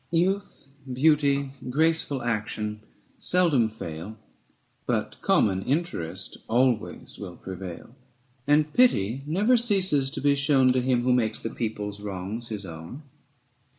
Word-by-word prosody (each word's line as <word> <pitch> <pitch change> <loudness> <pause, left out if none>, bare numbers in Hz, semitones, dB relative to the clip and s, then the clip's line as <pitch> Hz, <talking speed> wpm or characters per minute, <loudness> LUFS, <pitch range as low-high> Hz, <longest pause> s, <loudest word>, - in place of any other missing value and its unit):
Youth, 185 +3 0 0.3
beauty, 140 0 +2 0.2
graceful 155 -2 +1
action 105 -2 -2 0.4
seldom 160 -11 +3
fail, 100 0 -7 0.7
But - - -1
common 95 -2 +2
interest 140 - -2
always 120 -1 0
will - - -7
prevail; 95 +3 -8 0.5
And 150 +1 +3
pity 130 - +3
never 210 +10 +3
ceases 190 - +2
to 140 - -5
be 145 +1 +3
shown 140 -2 +4
725 125 0 +2
To 130 - +1
him 120 -1 +2
who 125 0 +3
makes 115 -3 +1
the 115 - -5
people's 105 -3 -4
wrongs 105 +3 -5
his 105 -3 -5
own. 85 - -9
125 Hz, 125 wpm, -26 LUFS, 105-150 Hz, 0.7 s, shown